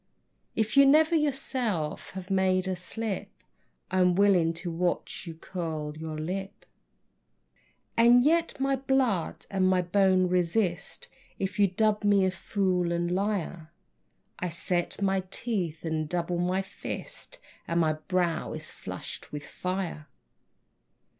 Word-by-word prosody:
If 220 -1 0
you 275 0 +8
never 310 +4 +5
yourself 260 - 0
have 190 +1 -7
made 190 -1 +2
a 185 - 0
slip, 205 +3 -4 0.6
I'm 180 -1 +3
willing 190 -4 +4
to 170 +1 -5
watch 175 +2 -2
you 165 - -6
curl 160 -3 -4
your 155 0 -5
lip. 190 +5 -5 1.3
And 240 +1 +6
yet 330 +1 +2
my 270 0 +1
blood 260 -9 0
and 190 -1 +2
my 185 -1 +3
bone 185 0 +3
resist 180 - 0 0.3
If 195 +1 -3
you 200 - +6
dub 210 +3 +1
me 200 -2 +4
fool 185 -2 0
and 170 0 0
liar. 180 -4 -2 0.7
I 180 - -1
set 175 +1 -1
my 195 -1 +2
teeth 185 -8 -2
and 155 -1 -1
double 175 0 -1
my 180 +2 +1
fist 190 - -6 0.3
And 170 0 +1
my 155 -1 +3
brow 170 +2 -1
is - - -5
flushed - - -7
with 150 0 -6
fire. 180 -4 -4
185 Hz, 130 wpm, -28 LUFS, 170-205 Hz, 1.3 s, you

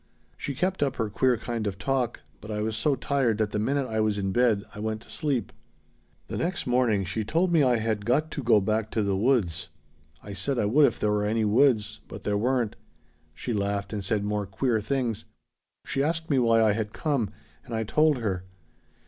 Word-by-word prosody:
"She 140 - -5
kept 185 +5 -1
up 135 -2 +1
her 110 -3 -2
queer 125 +3 +2
kind 115 -1 -3
of 95 -2 -3
talk, 125 +2 -1 0.2
but 105 - -11
I 105 -1 -2
was 110 0 -2
so 140 +6 +1
tired 130 -4 +1
that 110 -1 0
the 105 - -1
minute 135 +5 0
I 110 -2 -2
was 110 -1 +1
in 95 -1 -1
bed 115 -2 +2
I - - -9
went 110 0 -3
to - - -14
sleep. 140 -7 -1 0.7
"The - - -4
next 175 +3 -2
morning 120 -5 +2
she 100 +5 -2
told 170 - +1
me 165 -3 +4
I 125 -3 +4
had 110 -2 -1
got 145 +8 +1
to 145 - -4
go 115 -4 +5
back 110 +2 0
to 110 - +1
the 100 -1 0
woods. 95 - +1 0.5
I 100 - -7
said 135 +7 -2
I 110 - +2
would 140 +8 +5
if - - -3
there 105 - +1
were 105 0 +1
any 110 +1 +1
woods. 110 -2 +3
But - - -9
there 105 - 0
weren't. 120 +1 0 0.6
She 120 - -3
laughed 100 0 -1
and 105 -2 -3
said 105 +1 0
more 105 -1 -1
queer 110 +3 0
things. 115 -2 -2 0.6
She 135 - -1
asked 160 +2 -1
me 135 - +4
why 115 -2 +4
I 110 - +4
had 105 0 -3
come, 140 - 0 0.3
and 115 - -6
I 110 - 0
told 150 +6 +3
her. 95 -6 -2
110 Hz, 215 wpm, -27 LUFS, 105-130 Hz, 0.7 s, go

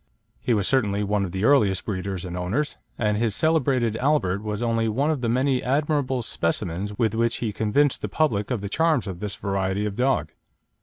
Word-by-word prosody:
He 120 - +1
was 100 -3 +1
certainly 105 -6 +2
one 105 0 0
of 90 - -6
the 95 +2 -3
earliest 110 -8 +3
breeders 95 -2 -3
and 90 -1 -5
owners, 100 +13 -2 0.2
and 105 -2 +1
his 110 -2 0
celebrated 135 -8 +2
Albert 125 -9 +1
was 105 +1 -3
only 115 -1 +1
one 140 +8 +1
of 150 -5 -2
the 115 - 0
many 130 +2 +1
admirable 140 -2 0
specimens 95 +2 -2
with 110 -3 +1
which 115 +1 +1
he 110 -3 -3
convinced 125 +8 +1
the - - -3
public 110 -10 0
of 125 -6 -1
the 100 - -4
charms 160 +4 +1
of 95 -4 -6
this 105 0 -4
variety 95 +1 -1
of 105 -2 -3
dog. 125 - +1
110 Hz, 200 wpm, -24 LUFS, 100-130 Hz, 0.2 s, earliest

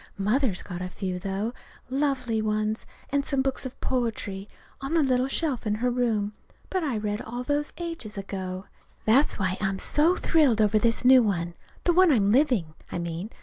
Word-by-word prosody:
Mother's 210 0 +1
got 180 -2 -6
a 180 - -3
few, 185 -1 -4
though 195 +5 -2 0.3
lovely 255 -4 0
ones 215 0 -1 0.2
and 280 0 +2
some 275 -1 0
books 265 0 -2
of 255 - -13
poetry, 215 -6 -2 0.3
on 275 +5 -2
the 325 - +4
little 255 -1 +2
shelf 270 -4 -1
in 210 - +1
her 245 +3 0
room. 225 -4 0 0.4
But 375 -2 0
I 270 -7 -1
read 210 0 -2
all 240 +2 -5
those 290 +2 -1
ages 330 -12 -5
ago. 190 -1 -5 0.4
That's 260 +7 +4
why 190 -1 -1
I'm 195 -1 0
so 315 - +2
thrilled 290 -12 +3
over 215 0 +4
this 230 +2 +2
new 260 0 +8
one 175 -6 -1 0.3
the 350 - +3
one 365 -1 +6
I'm 205 -6 +3
living, 240 - +2 0.2
I - - -2
mean. 170 +3 -4
225 Hz, 185 wpm, -26 LUFS, 200-270 Hz, 0.4 s, new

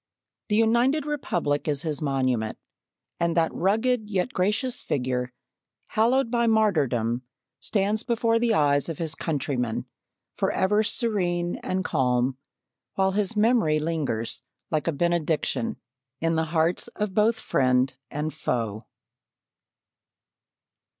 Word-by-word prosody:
The 210 - +2
United 240 +7 +3
Republic 175 - -1
is 145 -2 +1
his 155 -3 -2
monument, 130 -6 0 0.6
and 170 0 0
that 165 -1 +2
rugged, 220 +3 +1
yet 200 +6 -1
gracious 210 +7 0
figure, 125 -2 -1 0.6
hallowed 235 +2 +2
by 235 -1 +2
martyrdom, 140 - +2 0.4
stands 210 +1 0
before 230 -1 +1
the 235 0 +2
eyes 145 -1 +2
of 165 - -4
his 160 -2 0
countrymen 135 -7 -2 0.5
forever 210 +3 +1
serene 185 -6 0
and 185 0 -2
calm, 125 0 +1 0.6
while 190 0 +2
his 205 +2 0
memory 215 -8 +3
lingers 150 -8 -2 0.3
like 155 0 0
a - - +3
benediction 160 -5 0 0.4
in 165 0 +1
the 160 0 +1
hearts 165 +4 +1
of 210 -2 -2
both 220 +3 +3
friend 130 -3 +2
and 150 +1 -3
foe. 110 -3 -2
170 Hz, 115 wpm, -25 LUFS, 140-215 Hz, 0.6 s, United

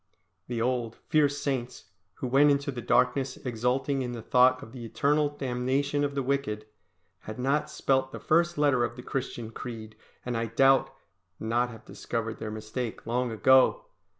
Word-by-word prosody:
The 120 -2 -3
old, 120 -1 -1
fierce 145 -2 +3
Saints, 130 -10 -4 0.2
who 130 - -4
went 140 +4 +5
into 140 0 +1
the 125 -2 -6
darkness 135 +2 +1
exulting 125 +3 -1
in 125 -1 -3
the 115 -2 -7
thought 125 +2 +4
of 110 - -11
the 125 -1 -9
eternal 145 +5 +1
damnation 140 +1 -1
of 140 -1 -2
the 135 - 0
wicked, 130 -6 -1 0.5
had 110 +3 -8
not 140 +4 0
spelt 130 -3 0
the - - -7
first 170 +1 +2
letter 140 -4 +3
of 120 - -2
the 125 - -9
Christian 120 -4 -4
creed, 110 -2 -8 0.3
and 125 -1 -2
I 115 0 -1
doubt 135 +4 +4 0.5
not 120 +2 0
have 115 -2 -12
discovered 115 -1 -4
their 110 - -4
mistake 110 +2 -5
long 125 +2 0
ago! 130 - +4
125 Hz, 170 wpm, -28 LUFS, 115-140 Hz, 0.5 s, went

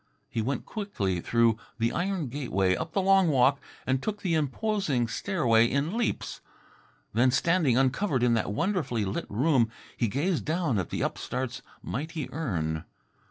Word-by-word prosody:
He 115 - -2
went 130 +3 -2
quickly 100 - -2
through 115 0 +2 0.2
the 115 0 +1
iron 180 -6 -1
gateway, 100 -9 +1
up 160 - -5
the 195 - +1
long 195 -1 +5
walk 140 -1 +4 0.3
and 130 0 +1
took 210 +3 -4
the 180 -4 +1
imposing 155 - 0
stairway 115 - +2
in 140 - -1
leaps. 235 -1 -2 0.7
Then, 120 +4 +4
standing 145 -1 +3
uncovered 135 +1 +2
in 120 -1 +4
that 115 -2 0
wonderfully 155 - 0
lit 95 - -3
room, 125 +1 +3 0.3
he 120 - +1
gazed 155 - 0
down 155 - 0
at 90 - -3
the - - -2
upstart's 125 0 -3 0.2
mighty 155 +2 -4
urn. 80 - -2
135 Hz, 155 wpm, -28 LUFS, 115-170 Hz, 0.7 s, long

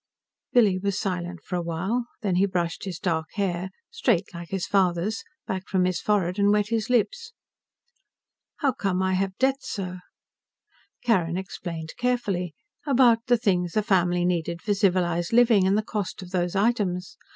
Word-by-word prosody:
Billy 210 -7 +4
was 200 0 -1
silent 180 -3 -3
for 180 - -4
a - - -1
while, 190 +9 -2 0.2
then 190 -4 +1
he 195 +2 +4
brushed 175 -2 -2
his 185 -4 -4
dark 165 -5 -1
hair 190 -3 -1 0.2
straight, 225 - 0
like 170 0 -8
his 195 -2 -2
father's 190 +2 +1 0.2
back 190 0 -4
from 185 -1 +2
his 180 -2 -1
forehead 195 -2 +1
and 200 0 +4
wet 210 0 +2
his 225 -1 -1
lips. 455 - 0 1.3
"How 280 -3 +3
come 190 -5 -1
I 190 0 +1
have 190 0 -1
debts, 270 +1 0
sir?" 185 -3 -4 1.0
Carrin 180 -8 +2
explained 170 -4 -6
carefully. 200 -9 -1 0.3
About 240 -4 +4
the 245 -1 +4
things 180 -5 0
a 215 - +3
family 180 -4 +2
needed 170 -1 -1
for 210 - +1
civilized 180 -3 +1
living, 230 -5 +5
and 195 +2 +3
the 215 - +1
cost 210 -3 -4
of 180 - -11
those 175 -1 -1
items. 195 -4 0
190 Hz, 165 wpm, -25 LUFS, 175-215 Hz, 1.3 s, living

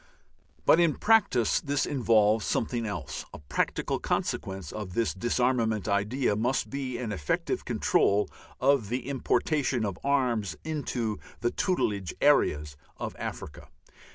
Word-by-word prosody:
But 160 - +6
in 170 -3 +3
practice 210 - +3
this 145 -1 0
involves 110 -5 +3
something 115 0 -1
else. 90 -10 -5
A - - -7
practical 75 - -1
consequence 95 -5 -2
of 105 -4 -6
this 115 -1 +1
disarmament 115 -1 0
idea 105 +4 +1
must 120 +5 0
be 135 -3 -3
an 120 -3 -4
effective 75 -9 -2
control 105 +1 +2 0.3
of 135 -5 +3
the 125 +2 -3
importation 135 -2 0
of 95 -4 -4
arms 125 -8 +1
into 125 -9 -2 0.2
the 120 0 +1
"tutelage" 105 - -1
areas 75 - +3 0.2
of - - -5
Africa. 75 - -6
115 Hz, 125 wpm, -28 LUFS, 100-135 Hz, 0.3 s, But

